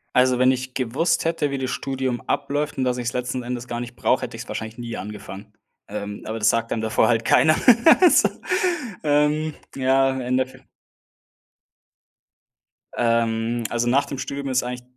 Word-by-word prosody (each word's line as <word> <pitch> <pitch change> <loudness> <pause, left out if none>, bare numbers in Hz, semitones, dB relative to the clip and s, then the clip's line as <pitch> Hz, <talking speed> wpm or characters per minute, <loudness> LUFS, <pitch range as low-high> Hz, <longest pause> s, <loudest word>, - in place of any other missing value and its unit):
Also, 125 0 +4
wenn 130 0 +5
ich 130 0 -4
gewusst 130 +9 0
hätte, 165 -3 0
wie 140 - -2
das 130 -1 -3
Studium 130 -2 -3
abläuft 145 +1 -2
und 130 - 0
dass 125 -1 0
ich's 120 -1 -3
letzten 125 0 -3
Endes 120 0 -5
gar 120 -1 -4
nicht 120 0 -7
brauche, - - +1
hätte - - -6
ich - - -6
es - - -20
wahrscheinlich 110 0 -6
nie 120 -1 -6
angefangen. 105 0 -9 0.3
Ähm, 105 0 -6
aber 110 +1 -4
das 110 0 +4
sagt 115 0 0
dann 110 - -1
davor 110 0 +2
halt 115 -1 +2
keiner 155 +7 +4 0.5
also, 360 - +6 0.8
ähm, 150 +1 +1 0.2
ja, 135 0 +2
Endeeff 130 +1 -1 2.4
Ähm, 115 0 0
also 120 0 0
nach 135 +3 +3
dem 140 - -6
Studium 140 +1 -4
ist 130 0 +1
eigentlich 125 0 -5
125 Hz, 170 wpm, -23 LUFS, 115-135 Hz, 2.4 s, also